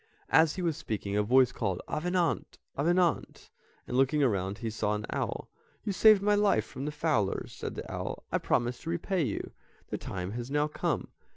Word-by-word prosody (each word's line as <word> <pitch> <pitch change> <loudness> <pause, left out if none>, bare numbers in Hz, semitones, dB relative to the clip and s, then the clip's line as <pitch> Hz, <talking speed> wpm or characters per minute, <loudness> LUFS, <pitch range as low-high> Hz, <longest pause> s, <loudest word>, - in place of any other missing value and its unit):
As 160 -1 +5
he 185 - -3
was 165 -3 0
speaking, 105 -9 -3
a 105 - +3
voice 125 +4 +4
called, 95 -6 -2
"Avenant, 175 +1 -1 0.2
Avenant," 175 +4 +1 0.3
and - - -4
looking 135 +3 +3
around 100 -5 0
he 115 -1 -4
saw 105 -1 0
an 105 0 -4
owl. - - -3 0.4
"You 205 - -1
saved 210 0 +6
my 210 0 +4
life 205 - +3
from 135 - -7
the 150 - -2
fowlers," 150 -10 0
said - - -6
the - - -6
owl. - - -4
"I - - +1
promised 120 +1 0
to 165 - -6
repay 175 +2 0
you, 120 -9 -2 0.4
the - - -3
time 90 0 -5
has 120 +3 -5
now 145 +1 +1
come. 150 - -2
140 Hz, 190 wpm, -30 LUFS, 110-170 Hz, 0.4 s, saved